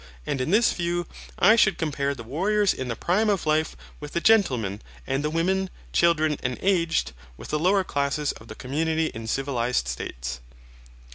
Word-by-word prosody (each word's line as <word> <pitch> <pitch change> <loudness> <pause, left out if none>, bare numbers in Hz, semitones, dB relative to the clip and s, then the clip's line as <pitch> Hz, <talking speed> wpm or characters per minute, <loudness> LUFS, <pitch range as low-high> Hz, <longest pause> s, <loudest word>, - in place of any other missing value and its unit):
And 135 - -2
in 130 - -2
this 215 +5 +4
view, 175 0 -1 0.3
I 215 +5 +6
should 195 -6 +3
compare 140 -3 -1
the 115 - -8
warriors 195 - +1
in 130 - -5
the 115 - -2
prime 210 - +1
of 200 -5 0
life 155 0 +1 0.2
with 150 -1 -8
the - - +1
gentlemen, 130 - +2 0.2
and 135 +2 -1
the 150 - 0
women, 185 +4 0 0.2
children, 155 -3 +3
and 125 -1 -2
aged, 170 -4 +1 0.3
with - - -10
the 150 - 0
lower 190 +4 +3
classes 145 -1 -1
of 110 - -13
the 110 - -9
community 160 +5 -1
in 110 0 -7
civilized 125 - -1
states. - - -5
155 Hz, 180 wpm, -25 LUFS, 130-180 Hz, 0.3 s, I